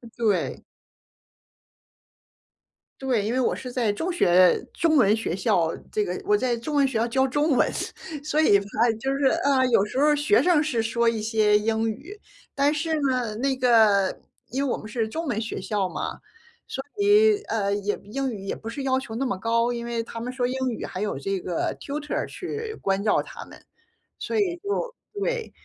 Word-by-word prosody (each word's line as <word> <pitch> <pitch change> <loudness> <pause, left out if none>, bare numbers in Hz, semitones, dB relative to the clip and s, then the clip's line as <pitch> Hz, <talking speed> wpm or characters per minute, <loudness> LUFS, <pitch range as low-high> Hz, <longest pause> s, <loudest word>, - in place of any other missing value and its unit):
对。 215 -5 0 2.4
对， 250 -6 +1
因 220 - -1
为 255 - 0
我 255 - +1
是 250 - -7
在 230 -5 0
中 340 - -2
学 185 - +5
中 320 -2 +2
文 215 -3 +5
学 215 -6 -2
校 170 -3 +1 0.2
这 210 - +1
个 180 -2 -3
我 210 - +4
在 240 +2 0
中 295 +6 -4
文 275 -1 +4
学 250 -4 -2
校 230 +2 +1
教 265 +3 +2
中 290 +4 +1
文。 - - +3 0.5
所 305 +1 +1
以 200 -10 +5
它 220 +4 +1
就 270 +2 -1
是， 275 0 0 0.2
啊， 275 -2 +3
有 220 -4 +3
时 255 +5 -3
候 295 +1 +4
学 295 +9 +3
生 340 -4 +3
是 245 -7 0
说 230 +1 0
一 225 -2 +1
些 215 -1 +3
英 225 +1 0
语， 305 - -6 0.4
但 285 +2 +3
是 315 +1 -1
呢， 250 -5 0
那 265 +3 0
个 220 -6 +4 0.3
因 270 +3 -1
为 - - -1
我 - - -2
们 215 - -9
是 220 0 -2
中 325 +7 -4
文 220 - -1
学 225 - -4
校 205 -3 -1
嘛， - - -5 0.6
所 270 - -3
以， 415 +1 +5
呃， 200 -3 -1
也 205 0 -1
英 265 +5 -3
语 205 - -7
也 - - -3
不 225 - -8
是 270 +4 -5
要 260 -1 +1
求 240 -4 -7
那 265 +4 -1
么 220 -7 -2
高， 230 +3 +1
因 235 0 -4
为 235 -1 -2
他 230 - -8
们 250 +2 -4
说 255 -1 -2
英 255 - -3
语 235 - -4
还 185 - -5
有 210 -8 -2
这 195 +7 -2
个 175 -1 -2
Tutor 295 +1 -4
去 440 0 -6
关 195 0 0
照 210 - +3
他 - - -10
们。 - - -15 0.6
所 450 - -2
以 365 -4 +1
就 415 +6 -3 0.2
对。 475 +2 -2
240 Hz, 220 characters per minute, -25 LUFS, 215-285 Hz, 2.4 s, 学